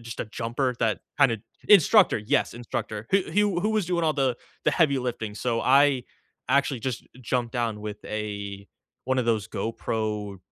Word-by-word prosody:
just 115 0 -7
a - - -2
jumper 120 +3 -2
that 110 -5 0 0.2
kinda 125 -6 +4 0.3
Instructor, 205 +1 +6
yes, 115 +6 0
instructor, 110 -2 -5
h 195 -1 +3
who 205 -3 +1
who 215 +4 +1
was 215 -4 +1
doing 170 -2 0
all 155 - +3
the 130 -4 +1 0.3
the - - +4
heavy 145 -6 +3
lifting, 115 -4 -4
so 115 0 -1
I 135 -1 +4 0.4
actually 135 -2 +2
just 125 -2 -4
jumped 120 -1 -1
down 115 -4 -2
with 105 0 -7
a 100 -2 -5 0.4
one 130 0 0
of 125 - +1
those 110 -3 +1
GoPro 105 -3 -3
120 Hz, 170 wpm, -26 LUFS, 110-140 Hz, 0.4 s, Instructor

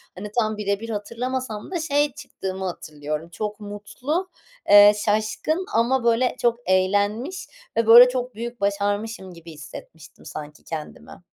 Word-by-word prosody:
hani, 205 +3 -7
tam 215 -2 0
bire 200 -1 -1
bir 230 +1 -7
hatırlamasam 235 - -4
da 355 - -1
şey 290 -3 +1
çıktığımı 190 0 -6
hatırlıyorum. 150 -3 -5
Çok 210 +4 -4
mutlu, 245 - -4 0.4
eee, 205 0 +9
şaşkın 220 - 0
ama 240 +3 +2
böyle 235 +2 +2
çok 235 0 +2
eğlenmiş 205 - 0 0.3
ve 230 -1 +2
böyle 240 +2 +10
çok 250 -1 -3
büyük 235 +1 -6
başarmışım 200 0 -2
gibi 170 -1 -12
hissetmiştim 155 0 -12
sanki 150 -1 -9
kendimi. 160 +2 -8
210 Hz, 135 wpm, -23 LUFS, 190-245 Hz, 0.4 s, böyle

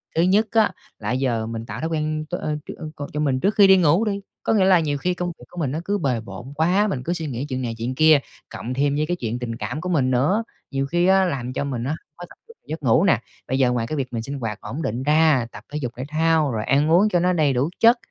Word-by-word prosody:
Thứ 165 - +3
nhất 200 +5 +3
á 220 -2 +3 0.3
là - - -3
giờ 125 -3 0
mình 115 0 -5
tạo 105 +1 -6
thói 160 - -2
quen 155 -1 -2
t - - -15
ơ, 155 -3 -2
ch - - -5
ơ, 155 -2 -7 0.2
c - - -19
cho 150 - -2
mình 140 -4 +1
trước 200 +9 +1
khi 200 -2 +7
đi 190 0 +7
ngủ 175 +4 +3
đi, 200 -2 -2 0.2
có - - +1
nghĩa 200 -4 +4
là 185 -2 +6
nhiều 145 -3 -1
khi 180 +6 -1
công 180 0 -3
việc - - -13
của 175 - -9
mình 145 -6 -1
nó 155 - -2
cứ 205 +1 0
bề 130 - 0
bộn 120 +4 -9
quá, 180 +7 +2
mình 135 -11 -3
cứ 170 - -1
suy 165 -3 -4
nghĩ 130 0 -4
chuyện 130 -1 -2
này, 115 -2 -3
chuyện 120 +3 -3
kia, 155 +1 +6 0.3
cộng 125 - -5
thêm 140 +2 +1
với 150 +1 +1
cái 175 +3 -1
chuyện 120 -4 -3
tình 120 -2 -4
cảm 145 +6 -4
của 180 - -4
mình 135 -7 +2
nữa, 150 - +2 0.3
nhiều 135 -1 -1
khi 175 +4 +1
á, 190 0 +5
làm 130 -7 -3
cho 130 - -2
mình 130 -4 -3
á, 135 +4 -1 0.2
khó 175 - -9
tập - - -15
trung 460 - -16
giấc 155 0 -6
ngủ 125 +6 +4
nè. 185 - +4 0.3
Bây 130 +1 -1
giờ 125 -2 +4
ngoài 120 -2 -1
cái 155 - -3
việc 130 -4 -3
mình 115 - -2
sinh 140 +4 -5
hoạt 110 -3 -4
ổn 125 +9 -5
định 120 -2 -2
ra, 150 -4 +3
tập - - -11
thể 150 - -3
dục 125 -4 -3
thể 130 - -4
thao, 155 -1 +2
rồi 110 -2 -2
ăn 145 +4 +2
uống 190 +6 +5
cho 180 - +2
nó 180 +1 +2
đầy 150 -5 +2
đủ 130 +5 +1
chất, 235 +2 +6
150 Hz, 300 wpm, -22 LUFS, 125-175 Hz, 0.3 s, khi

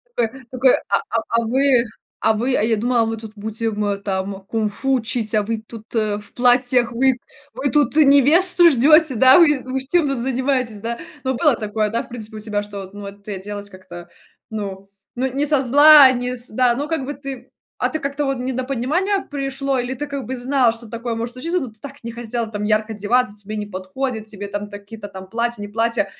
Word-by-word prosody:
Такой 240 +3 -2
такой: 255 0 +4 0.2
"A 200 - +3
а 230 - 0
а 230 - +2
вы 260 +1 +3 0.4
а 220 - +3
вы 245 +4 0
а - - +1
я 225 0 +2
думала, 235 +1 +1
мы 225 0 -3
тут 220 -1 -10
будем 210 -1 -3
там 195 0 -3
кунг-фу 220 +6 -2
учить, 230 -2 -1
а 210 - +2
вы 225 +1 -3
тут 225 -2 -10
в 210 -2 -2
платьях, 245 -1 +3
вы 255 +1 +2 0.3
вы 275 +1 -2
тут 295 -3 +2
невесту 315 +5 +6
ждете, 305 +2 +5
да? 260 +5 +7
Вы 295 -6 +4
вы 260 +1 -3
чем 345 -4 +3
тут 275 -1 -1
занимаетесь, 255 -3 -1
да?" 235 +2 -3 0.3
Ну, 260 -1 -1
было 295 0 +3
такое, 215 0 -2
да, 230 +2 -1
в - - -17
принципе 220 -2 -8
у - - -6
тебя, 210 -1 -3
что 200 -2 -8
ну 205 - -9
вот 200 0 -10
ты 205 -1 -5
оделась 205 +1 -7
как-то 180 -2 -12 0.4
ну 195 -3 -6 0.3
ну 255 +2 0
не 280 +2 0
со 295 -2 +2
зла, 285 +1 +8
не 250 0 -3
с 245 0 +2
да. 245 +2 +2
Ну 285 +4 -3
как 320 -5 -1
бы 290 - -4
ты, 270 -3 -9 0.3
а - - +1
ты 315 - -3
как-то 280 +1 -2
вот 270 -1 -1
недопонимание 265 - -1
пришло, 275 -1 -2
или 245 +1 -2
ты 295 +3 -5
как 280 -2 -5
бы 260 - -4
знала, 255 -1 +2
что 230 -1 -11
такое 235 +1 -4
может 230 +1 -4
случиться, 335 +8 -2
но 265 - -4
ты 220 -2 -14
так 280 -1 -11
не 230 - -5
хотела 235 0 -4
там 210 -1 -5
ярко 215 +1 0
одеваться, 215 +2 0
тебе 210 +1 -6
не 210 -1 -4
подходит, 215 +5 -4
тебе 205 -2 -7
там 205 +1 -5
такие-то 205 +1 -9
там 190 -1 -10
платья, 235 +1 -2
не 205 - -5
платья, 230 +2 0
235 Hz, 215 wpm, -20 LUFS, 215-265 Hz, 0.4 s, зла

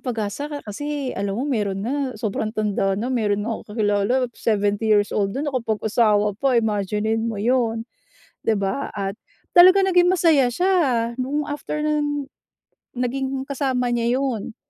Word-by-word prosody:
pag-asa 235 +3 -3
ka 290 -1 -7
kasi 280 +5 -4
alam 195 0 -3
mo 255 - -1
meron 210 -7 -1
nga 270 0 -2
sobrang 215 0 -2
tanda 200 -2 0
na, 245 +5 -2
meron 205 -4 0
nga 230 - -2
ako 215 -1 -8
kakilala 205 0 +1 0.2
70 205 -1 0
years 205 -1 +3
old 200 +2 -1
yun 285 - -2
nakapag-asawa 220 -5 +1
pa 270 -3 +2
imaginin 220 +1 0
mo 220 - -4
'yon, 230 0 0 0.6
'di 220 -3 +1
ba? 230 +9 -2
At 195 -1 -4 0.4
talaga 370 +2 +8
naging 360 -2 +4
masaya 310 -8 +3
siya 365 +9 +1 0.4
no'ng 280 +4 -2
after 295 +1 -4
nung 295 -2 -1 0.7
naging 265 +2 -2
kasama 265 -2 -1
niya 240 +2 +1
'yon, 235 -5 -3
235 Hz, 150 wpm, -22 LUFS, 210-275 Hz, 0.7 s, talaga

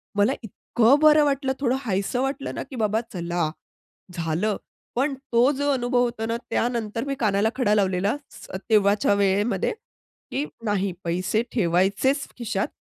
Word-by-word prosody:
मला 205 +6 +3
इतकं 235 +5 +2
बरं 305 -1 +7
वाटलं 275 -1 0
थोडं 255 -2 +1
हायसं 205 +3 -1
वाटलं 270 +1 -2
ना, - - -3
की 265 - -11
बाबा 220 -1 +1
चला, 170 -2 -1 0.6
झालं. 170 +5 -1 0.4
पण 275 +3 +1 0.2
तो 245 +4 +5
जो 285 +1 -1
अनुभव 245 -1 +1
होतो 235 -2 -2
ना 230 +1 -1
त्यानंतर 230 -1 -1
मी 275 -1 -2
कानाला 210 -1 +2
खडा 240 -5 +2
लावलेला 195 +2 +1 0.2
स - - -12 0.2
तेव्हाच्या 205 -1 +4
वेळेमध्ये 200 - +1 0.6
की 285 +3 -1 0.2
नाही 200 -2 0
पैसे 185 +5 0
ठेवायचेच 200 - +2
खिशात, 210 -4 -1
220 Hz, 145 wpm, -24 LUFS, 195-260 Hz, 0.6 s, बरं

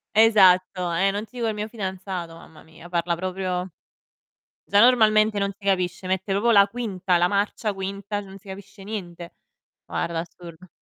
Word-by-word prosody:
Esatto, 185 -5 +4
eh, 190 +4 +2
non 205 +2 -3
ti 245 +3 -14
dico 235 - -1
il 220 - -1
mio 210 +1 -5
fidanzato, 190 -5 -5
mamma 160 -1 -15
mia, 160 +2 -15
parla 170 0 0
proprio 185 0 -3 1.0
già 200 - +3
normalmente 215 -3 +5
non 200 0 0
si 200 +1 -21
capisce, 185 -2 -1
mette 190 +1 -2
proprio 220 +4 +1
la 200 -3 +7
quinta, 200 -6 -1
la 175 +1 +3
marcia 205 +2 -1
quinta, 200 +1 -4
non 195 -1 -11
si 195 - -21
capisce 195 +1 -11
niente. 175 -5 -7 0.5
Guarda, 170 -1 -3
assurdo. 170 0 -12
195 Hz, 165 wpm, -24 LUFS, 180-205 Hz, 1.0 s, la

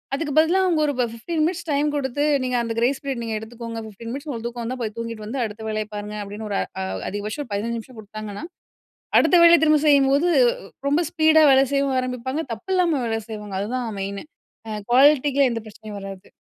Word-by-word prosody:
அதுக்கு 295 +1 -3
பதிலா 335 +4 +3
அவுங்க 335 -4 +2
ஒரு 285 - 0
ப்ப 250 - +2
15 310 +8 -3
மினிட்ஸ் 340 0 -3
டைம் 290 +1 +2
குடுத்து, 280 0 -1 0.2
"நீங்க 250 -1 0
அந்த 230 -1 -3
கிரேஸ் 255 +4 +1
பீரியட் 270 -4 -3
நீங்க 225 -1 -3
எடுத்துக்கோங்க. 230 +1 -7
15 230 +3 -9
மினிட்ஸ் 280 +4 -6
உங்களுக்கு 235 -3 -4
தூக்கம் 240 0 -6
வந்தா, 255 +3 -3
போய் 220 -2 -3
தூங்கிட்டு 230 -2 -5
வந்து 250 +6 -4
அடுத்த 215 +1 -8
வேலைய 215 0 -2
பாருங்க 210 +1 -5
அப்டின்னு 210 +2 -7
ஒரு 200 - 0 0.2
அ - - -1 0.3
அதிகபட்சம் 210 +8 -4
ஒரு 240 - -16
15 230 +3 -2
நிமிஷம் 235 +1 -13
குடுத்தாங்கன்னா, 215 +2 -8 0.8
அடுத்த 360 - +4
வேலைய 340 0 +8
திரும்ப 305 -1 +5
செய்யும்போது, 280 +2 +4 0.3
உ - - -12 0.2
ரொம்ப 295 +4 +3
ஸ்பீடா 315 -1 +5
வேலை 270 0 +5
செய்யவும் 275 -1 +1
ஆரம்பிப்பாங்க. 255 +4 -3
தப்பில்லாம 340 - 0
வேலை 225 -1 -1
செய்வாங்க. 210 -2 -6
அதுதான் 245 +3 -3
மெயினு. 200 +4 -5 0.4
அ - - -4 0.2
குவாலிட்டிக்கு 280 +1 +5
எந்த 230 -1 -3
பிரச்சனையும் 215 -1 -9
வராது. 195 0 -9
245 Hz, 195 wpm, -23 LUFS, 215-285 Hz, 0.8 s, வேலைய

